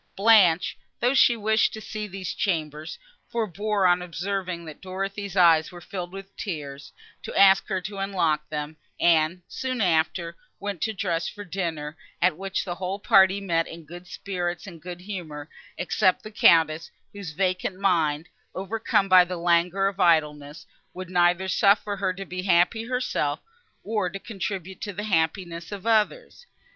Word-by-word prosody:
Blanche, 195 -5 +4 0.2
though 245 +2 +2
she 240 -3 +5
wished 220 0 +2
to 220 - -6
see 215 0 -6
these 190 -2 -5
chambers, 155 -5 -2 0.3
forbore, 210 -2 -1
on 180 0 +4
observing 180 0 -4
that 155 -2 -10
Dorothée's 195 +1 -5
eyes 165 -3 +5
were 175 - -10
filled 175 0 -6
with 195 +1 -10
tears, 140 -7 -6 0.3
to - - -3
ask 195 -1 +6
her 190 -3 -1
to 195 +2 -6
unlock 165 -6 0
them, 150 0 -5 0.2
and, 170 +1 +3
soon 255 -1 -4
after, 170 -2 +1 0.2
went 200 -3 -5
to 220 - 0
dress 175 -4 -1
for 205 - -9
dinner, 160 -5 -4 0.2
at 180 -2 +3
which 195 +3 -3
the 175 - -3
whole 185 +2 -4
party 195 -1 +4
met 170 -4 0
in 165 -1 -10
good 175 +3 -11
spirits 175 -3 -4
and 170 -5 -11
good 180 +1 -8
humour, 170 -7 -7 0.3
except 185 +1 +1
the 215 - -9
Countess, 165 -5 +4 0.2
whose 200 -6 -7
vacant 185 +2 -1
mind, 165 -5 +1 0.3
overcome 200 0 0
by 185 -1 +8
the 180 0 -5
languor 175 +3 +2
of 195 0 -4
idleness, 150 -3 +1 0.3
would 185 0 -7
neither 175 +1 +3
suffer 200 +2 +2
her 190 -1 0
to 195 +1 -7
be 180 0 -5
happy 185 +5 +2
herself, 250 - -1 0.5
nor 210 -3 -1
to 195 - -6
contribute 190 -3 -6
to 205 - -4
the 205 +3 -5
happiness 170 -2 -1
of 200 -1 -7
others. 230 - 0
185 Hz, 160 wpm, -25 LUFS, 170-200 Hz, 0.5 s, by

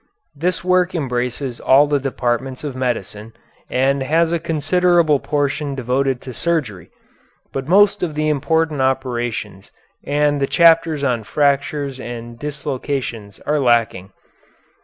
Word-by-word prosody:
This 170 +5 -1
work 180 0 +2
embraces 125 -3 -3
all 135 +3 +5
the 145 -1 +1
departments 130 0 -2
of 145 -3 -5
medicine, 115 -4 -3 0.4
and 135 +2 +1
has 160 +4 +2
a 170 - 0
considerable 165 -1 +2
portion 145 0 -2
devoted 130 0 -1
to 130 - -8
surgery, 130 - -2 0.6
but 135 0 -4
most 205 +3 +4
of 160 -4 -2
the 155 0 0
important 155 0 0
operations 120 -6 -2 0.3
and 145 0 +1
the 135 - +1
chapters 165 -3 +4
on 120 -4 0
fractures 140 +2 0
and 120 -1 -8
dislocations 135 -7 -4
are 150 0 0
lacking. 115 -7 +1
140 Hz, 125 wpm, -19 LUFS, 125-155 Hz, 0.6 s, all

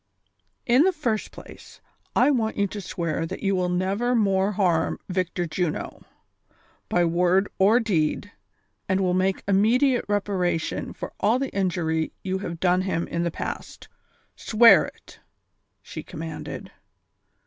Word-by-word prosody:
" - - -46 0.2
In 250 +3 +4
the 375 +4 +4
first 240 - -2
place, - - -13 0.4
I 295 - +5
want 225 -5 0
you 200 - +2
to 205 +1 -6
swear 165 -3 -3
that - - -7
you 195 -1 +1
will 180 -1 0
never 195 +7 0
more 195 -2 +2
harm 175 -5 +1
Victor 180 -1 -1
Juno, 165 -1 -3 0.9
by 175 0 +2
word 180 +3 +2
or 210 +5 +5
deed, 200 -2 -1 0.6
and 190 0 +2
will 185 -2 +1
make 190 +1 0
immediate 235 +7 +3
reparation 195 -5 -1
for - - -8
all 215 +5 +3
the 270 0 -3
injury 170 -4 -1
you 190 0 -2
have 170 -4 -6
done 180 0 +2
him 185 -3 -2
in 170 - -2
the 170 - 0
past. - - -7 0.5
Swear 220 -6 +6
it! - - -15 0.3
" - - -50
she - - -7
commanded. 160 0 -7
190 Hz, 150 wpm, -24 LUFS, 175-210 Hz, 0.9 s, Swear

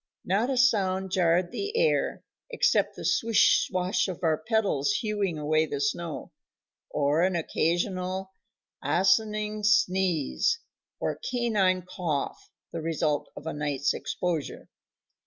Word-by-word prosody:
Not 205 +7 +1
a 265 - 0
sound 190 -7 +2
jarred 175 -1 +2
the 415 +3 -3
air, 480 0 +1 0.3
except 480 0 +2
the - - -7
swish 230 -1 +3
swash 185 +2 0
of 180 -1 -6
our 160 -2 +3
pedals 215 - +1
hewing 205 -6 -1
away 155 +1 +1
the 145 - -4
snow, 155 +3 -3 0.6
or 145 +2 +1
an 185 0 +2
occasional 185 +3 -1 0.5
asinine 210 +6 +1
sneeze, 190 - +2 0.4
or - - -2
canine 205 -7 +1
cough, 170 -7 -3 0.2
the 165 - -4
result 155 -2 -1
of - - -9
a 160 - -3
night's 145 -2 -1
exposure. 170 -5 -3
185 Hz, 120 wpm, -27 LUFS, 160-210 Hz, 0.6 s, swish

